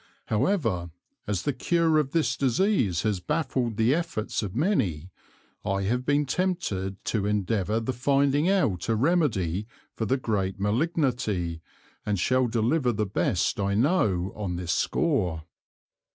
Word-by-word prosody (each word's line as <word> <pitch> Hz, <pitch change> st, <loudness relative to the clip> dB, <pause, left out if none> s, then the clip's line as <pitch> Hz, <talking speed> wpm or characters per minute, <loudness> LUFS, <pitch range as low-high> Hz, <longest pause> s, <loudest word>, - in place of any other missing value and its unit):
However 110 Hz, -, 0 dB, 0.4 s
as 100 Hz, -4 st, -1 dB
the 145 Hz, -, 0 dB
Cure 165 Hz, +4 st, +2 dB
of 145 Hz, -3 st, 0 dB
this 160 Hz, +2 st, +1 dB
Disease 130 Hz, -, +1 dB
has 105 Hz, -4 st, 0 dB
baffled 125 Hz, -, -1 dB
the 115 Hz, +4 st, +3 dB
Efforts 160 Hz, -10 st, -2 dB
of 100 Hz, -2 st, -5 dB
many, 95 Hz, -, 0 dB, 0.5 s
I 100 Hz, 0 st, -1 dB
have 125 Hz, +6 st, -1 dB
been 145 Hz, 0 st, +3 dB
tempted 130 Hz, -, -2 dB
to 105 Hz, -3 st, 0 dB
endeavour 105 Hz, +1 st, 0 dB
the 115 Hz, +3 st, -2 dB
finding 140 Hz, -, +2 dB
out 135 Hz, -, +1 dB
a 115 Hz, -, +3 dB
Remedy 110 Hz, -, +1 dB, 0.3 s
for 110 Hz, -, -3 dB
the 135 Hz, -, +2 dB
great 100 Hz, -6 st, -2 dB
Malignity, 110 Hz, -, 0 dB, 0.4 s
and 105 Hz, -1 st, -1 dB
shall 130 Hz, +6 st, +2 dB
deliver 120 Hz, +4 st, +1 dB
the 105 Hz, -1 st, -1 dB
best 95 Hz, -1 st, 0 dB
I 100 Hz, 0 st, 0 dB
know 105 Hz, -, +1 dB
on 100 Hz, -4 st, -3 dB
this 85 Hz, -1 st, -3 dB
Score. 95 Hz, -, 0 dB
115 Hz, 140 wpm, -26 LUFS, 100-145 Hz, 0.5 s, the